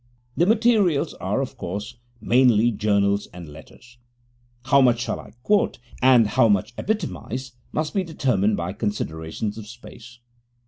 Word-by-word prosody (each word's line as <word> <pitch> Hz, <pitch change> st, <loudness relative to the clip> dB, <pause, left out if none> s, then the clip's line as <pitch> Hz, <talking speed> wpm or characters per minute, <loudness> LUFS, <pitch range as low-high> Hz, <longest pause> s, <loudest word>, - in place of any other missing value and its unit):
The 175 Hz, -, +2 dB
materials 215 Hz, -8 st, +2 dB
are, -, -, -1 dB
of -, -, -6 dB
course, 105 Hz, +7 st, -5 dB, 0.2 s
mainly 120 Hz, 0 st, +4 dB
journals 100 Hz, -1 st, +1 dB
and 90 Hz, -2 st, -10 dB
letters. 80 Hz, +11 st, -15 dB, 0.7 s
How 140 Hz, +1 st, +5 dB
much 120 Hz, -2 st, +3 dB
I 110 Hz, -, -1 dB
shall -, -, -8 dB
quote 205 Hz, +5 st, +2 dB, 0.2 s
and 125 Hz, -3 st, +6 dB
how 115 Hz, +3 st, +3 dB
much 100 Hz, +3 st, +1 dB
epitomize 145 Hz, -, -4 dB, 0.2 s
must 155 Hz, 0 st, -2 dB
be 195 Hz, -, 0 dB
determined 120 Hz, -, 0 dB
by 85 Hz, +2 st, -3 dB
considerations 105 Hz, 0 st, -4 dB
of 105 Hz, -, -10 dB
space. 115 Hz, 0 st, -13 dB
120 Hz, 140 wpm, -23 LUFS, 105-135 Hz, 0.7 s, and